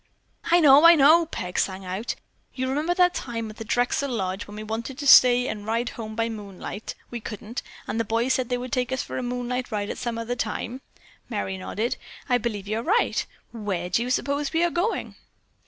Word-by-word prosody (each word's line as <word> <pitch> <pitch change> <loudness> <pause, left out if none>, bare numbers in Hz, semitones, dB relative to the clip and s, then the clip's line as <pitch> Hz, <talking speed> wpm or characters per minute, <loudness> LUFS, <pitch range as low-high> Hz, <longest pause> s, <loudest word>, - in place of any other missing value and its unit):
"I 345 +1 +5
know! 290 -2 +7
I 335 0 +10
know!" 320 +3 +6
Peg 180 - -3
sang 190 0 -1
out. 190 +6 -3 0.4
"You 260 0 -1
remember 300 +6 0
that 360 -1 +4
time 230 -3 -4
at 215 - -15
the 225 - -5
Drexel 245 +5 0
Lodge 190 -5 -3
when 205 - -10
we 215 - -6
wanted 225 +4 -4
to 290 - -5
stay 250 -2 +7
and 210 - -4
ride 230 +3 -1
home 220 -2 -7
by 230 +1 0
moonlight, 205 -1 -7 0.2
we 240 - -4
couldn't, 220 +2 -6 0.3
and 225 - -2
the - - +2
boys 230 +4 +1
said 255 -2 -1
they 250 - 0
would 250 0 -6
take 250 0 0
us 260 - -1
for - - -5
a - - -2
moonlight 245 0 -3
ride 205 -1 -2
at - - -6
some 235 -2 -3
other 230 +2 -3
time." 240 +2 -3 0.5
Merry 205 -4 -2
nodded. 215 +5 -3 0.3
"I 245 -2 +3
believe 210 -4 -3
you're 215 +2 -1
right. 420 - +2 0.3
Where 195 -6 -3
do 205 - +2
you 245 - -2
suppose 280 +3 0
we 330 +1 +2
are 345 - +2
going?" 355 +7 -1
240 Hz, 215 wpm, -25 LUFS, 215-260 Hz, 0.5 s, I